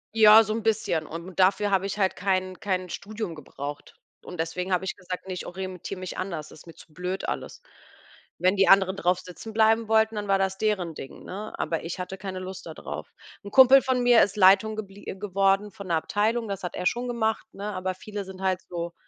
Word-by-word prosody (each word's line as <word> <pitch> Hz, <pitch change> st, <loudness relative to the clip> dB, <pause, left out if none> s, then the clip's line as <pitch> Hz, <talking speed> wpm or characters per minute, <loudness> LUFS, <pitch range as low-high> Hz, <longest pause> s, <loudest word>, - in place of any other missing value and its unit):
Ja 220 Hz, 0 st, +9 dB
so 215 Hz, 0 st, -2 dB
'n 225 Hz, -, -2 dB
bisschen 200 Hz, -8 st, 0 dB
und 170 Hz, +3 st, -8 dB
dafür 200 Hz, +2 st, +3 dB
habe 195 Hz, 0 st, +2 dB
ich 200 Hz, -, -4 dB
halt 190 Hz, -2 st, +1 dB
kein 185 Hz, -1 st, -1 dB
kein 185 Hz, -4 st, -2 dB
Studium 210 Hz, -2 st, -5 dB
gebraucht. 145 Hz, -1 st, -8 dB, 0.3 s
Und 180 Hz, -, -9 dB
deswegen 180 Hz, +3 st, -3 dB
habe 180 Hz, +1 st, +1 dB
ich -, -, -3 dB
gesagt, 180 Hz, -1 st, -7 dB
ne, 190 Hz, -, -4 dB
ich 180 Hz, -, -6 dB
orientiere 185 Hz, 0 st, -6 dB
mich 185 Hz, -1 st, -6 dB
anders, 170 Hz, -5 st, -5 dB
ist 160 Hz, -, -15 dB
mir 165 Hz, -, -12 dB
zu 155 Hz, -, -17 dB
blöd 180 Hz, +3 st, -4 dB
alles. 475 Hz, -, -5 dB, 0.7 s
Wenn 185 Hz, +2 st, +2 dB
die 195 Hz, -1 st, +4 dB
anderen 195 Hz, -1 st, +5 dB
drauf 180 Hz, 0 st, +1 dB
sitzen 200 Hz, +5 st, -10 dB
bleiben 220 Hz, 0 st, +3 dB
wollten, 220 Hz, 0 st, +3 dB
dann 210 Hz, -1 st, -4 dB
war 195 Hz, 0 st, +3 dB
das 190 Hz, 0 st, -1 dB
deren 190 Hz, -6 st, 0 dB
Ding, 135 Hz, -, -10 dB
ne? 210 Hz, +3 st, -7 dB
Aber 165 Hz, 0 st, -2 dB
ich 165 Hz, +3 st, -5 dB
hatte 185 Hz, +1 st, -6 dB
keine 190 Hz, -1 st, -5 dB
Lust 185 Hz, +1 st, -7 dB
da -, -, -8 dB
drauf. -, -, -7 dB, 0.3 s
'N 200 Hz, -, -7 dB
Kumpel 265 Hz, +3 st, +8 dB
von 255 Hz, -1 st, 0 dB
mir 245 Hz, -2 st, +6 dB
ist 200 Hz, -, +2 dB
Leitung 200 Hz, +3 st, +5 dB
geblie 205 Hz, -2 st, -8 dB
äh, -, -, -4 dB
geworden 195 Hz, +1 st, +1 dB
von 200 Hz, -3 st, -10 dB
'ner 170 Hz, -, +1 dB
Abteilung, 220 Hz, +7 st, 0 dB
das 200 Hz, -1 st, -4 dB
hat 180 Hz, -, -4 dB
er -, -, -4 dB
schon 245 Hz, +5 st, 0 dB
gemacht, 225 Hz, -2 st, -1 dB
ne? 205 Hz, +1 st, -5 dB
Aber 185 Hz, 0 st, -3 dB
viele 205 Hz, +1 st, -6 dB
sind 190 Hz, 0 st, -11 dB
halt 185 Hz, -1 st, +1 dB
so, 170 Hz, -1 st, -4 dB
190 Hz, 225 wpm, -26 LUFS, 180-210 Hz, 0.7 s, Ja